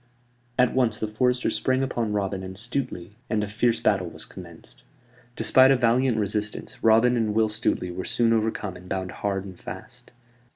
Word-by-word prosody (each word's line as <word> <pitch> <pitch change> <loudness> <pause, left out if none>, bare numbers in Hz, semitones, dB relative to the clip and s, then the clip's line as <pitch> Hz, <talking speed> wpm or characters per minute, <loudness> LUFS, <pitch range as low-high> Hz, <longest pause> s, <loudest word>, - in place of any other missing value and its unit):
At 125 -1 +3
once 120 -5 +1
the 110 - -1
foresters 125 +4 +1
sprang 130 0 +1
upon 120 -5 -2
Robin 100 -2 -1
and 95 0 -7
Stuteley, 115 -4 -4 0.2
and 110 -2 0
a - - -3
fierce 115 +2 +1
battle 100 -6 +1
was - - -11
commenced. - - -12 0.5
Despite 130 0 +5
a 135 - +6
valiant 125 0 +2
resistance, 105 0 -3
Robin 115 +2 +5
and 110 -3 0
Will 110 -1 +3
Stuteley 90 -4 -2
were 95 - -4
soon 115 -1 +2
overcome 110 -4 -1
and 90 0 -12
bound 95 -1 -3
hard 100 -1 -3
and 95 -3 -10
fast. - - -10
110 Hz, 175 wpm, -25 LUFS, 100-120 Hz, 0.5 s, a